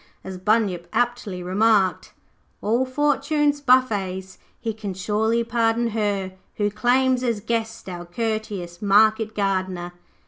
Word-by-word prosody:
As 190 -1 -7
Bunyip 195 -4 +1
aptly 235 -6 -1
remarked 195 0 +2 0.5
'All 235 +5 +1
Fortune's 290 +1 +1
buffets 200 -8 +1 0.2
he 225 -2 -3
can 205 -3 -6
surely 220 +4 0
pardon 230 0 +1
her, 205 -3 -1 0.2
Who 205 -1 0
claims 250 +4 +2
as 235 -4 0
guest 225 0 -3
our 175 -1 -6
courteous 205 -3 -4
Market 215 +2 +3
Gardener.' 185 -3 -1
215 Hz, 115 wpm, -23 LUFS, 190-235 Hz, 0.5 s, Market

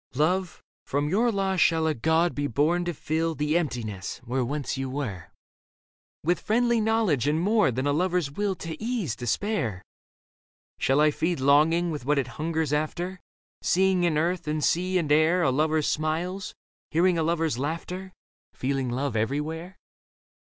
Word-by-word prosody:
Love, 180 +5 0 0.2
from 145 +2 -1
your 230 +7 +2
loss 195 -2 0
shall 160 -2 +3
a 160 - +2
god 160 +6 +2
be 145 0 -1
born 155 +8 +1
to 175 - -1
fill 160 +1 -2
The 150 +1 0
emptiness, 115 - -2
where 125 +2 -1
once 140 +1 -3
you 135 -1 -3
were, 110 - -4 1.0
With 175 - +1
friendly 235 +1 +2
knowledge 215 - +1
and 150 +2 +2
more 210 +2 +3
than 130 +2 -2
a 145 - +2
lover's 175 -2 0
will 200 +5 -1
To 165 -2 -6
ease 225 - -1
despair? 120 - -2 1.0
Shall 135 +2 +2
I 150 0 +5
feed 165 +1 -1
longing 155 +5 +4
with 150 -5 -5
what 145 +3 +1
it 140 - +1 0.2
hungers 160 -2 -1
after, 175 +5 -2 0.4
Seeing 190 0 +2
in 165 -3 +2
earth 170 +1 0
and 150 0 -1
sea 185 +4 +1
and 155 -5 -1
air 160 +4 +4
A 135 - +3
lover's 155 +2 +1
smiles, 170 +5 -2 0.3
hearing 170 +2 +2
a - - +2
lover's 160 -4 0
laughter, 175 +6 -4 0.4
Feeling 135 -1 -1
love 130 +1 -2
everywhere 150 - -2
160 Hz, 160 wpm, -26 LUFS, 145-180 Hz, 1.0 s, I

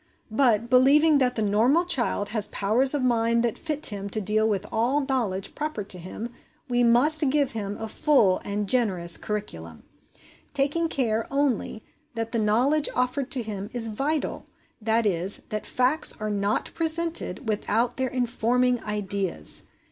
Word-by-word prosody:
But, 230 -2 +2
believing 280 +5 +4
that 250 -2 +1
the 220 - -1
normal 235 - +2
child 240 -10 0
has 215 -1 +5
powers 245 +8 +2
of 280 - -2
mind 235 -1 +1
that 235 -2 -1
fit 305 -2 -2
him 200 -2 -4
to 215 - -1
deal 215 +2 +1
with 205 -1 -2
all 240 +6 0
knowledge 225 -8 -2
proper 300 -8 -4
to 190 -2 -5
him, 185 +6 -7 0.4
we 245 -1 +1
must 280 +6 +5
give 285 -1 0
him 205 -2 -5
a 220 - -6
full 220 -7 +2
and 205 0 -3
generous 190 -8 +3
curriculum; 85 - -6 0.7
taking 290 +4 0
care, 225 -6 -1
only, 275 -6 -1 0.3
that 225 0 -4
the 230 - 0
knowledge 250 +8 +2
offered 250 +2 -1
to 255 -3 -2
him 205 -2 -6
is 230 -2 +2
vital 285 +8 -3 0.4
that 225 +1 +1
is, 190 0 0
that 215 -1 -4
facts 255 +5 +2
are 215 0 -3
not 200 0 -2
presented 330 -4 +1
without 225 +3 -1
their 260 -1 -1
informing 245 0 0
ideas. 200 - -2
235 Hz, 155 wpm, -24 LUFS, 210-270 Hz, 0.7 s, has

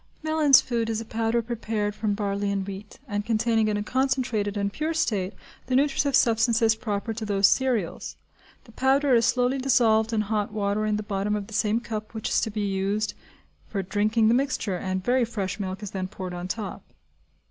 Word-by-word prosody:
Mellin's 310 -3 +5
Food 230 -2 -2
is 220 -1 -1
a 225 - -6
powder 225 +1 0
prepared 220 -3 -2
from 210 -1 -1
barley 200 -1 -1
and 200 -1 -1
wheat, 200 +1 -8
and 205 -2 -2
containing 225 0 +1
in 210 -1 0
a 205 - -2
concentrated 250 -5 0
and 200 0 -1
pure 315 +6 -2
state 205 - 0 0.4
the 255 - 0
nutritive 280 0 +2
substances 230 -2 +3
proper 220 -1 -3
to 220 0 -6
those 200 -2 +2
cereals; 235 -6 +1 0.5
the 230 - -17
powder 270 +3 +2
is 235 -1 +4
slowly 250 +2 +1
dissolved 235 -4 +3
in 220 -2 +1
hot 210 -1 -1
water 210 0 -1
in 210 - +1
the 215 - -4
bottom 205 0 -1
of 205 -1 -3
the 220 - -13
same 215 +1 +1
cup 215 -1 -6
which 220 - -3
is - - +2
to - - -1
be 210 0 -3
used 200 +2 -1 0.5
for 195 -2 -3
drinking 215 +4 +2
the 225 - +4
mixture, 255 -6 0
and 185 +1 -3
very 250 +1 +3
fresh 200 -4 -3
milk 190 +1 -4
is 200 - -6
then 185 -1 -3
poured 185 -1 -7
on 175 0 -5
top. 205 0 -5
215 Hz, 200 wpm, -25 LUFS, 200-235 Hz, 0.5 s, Mellin's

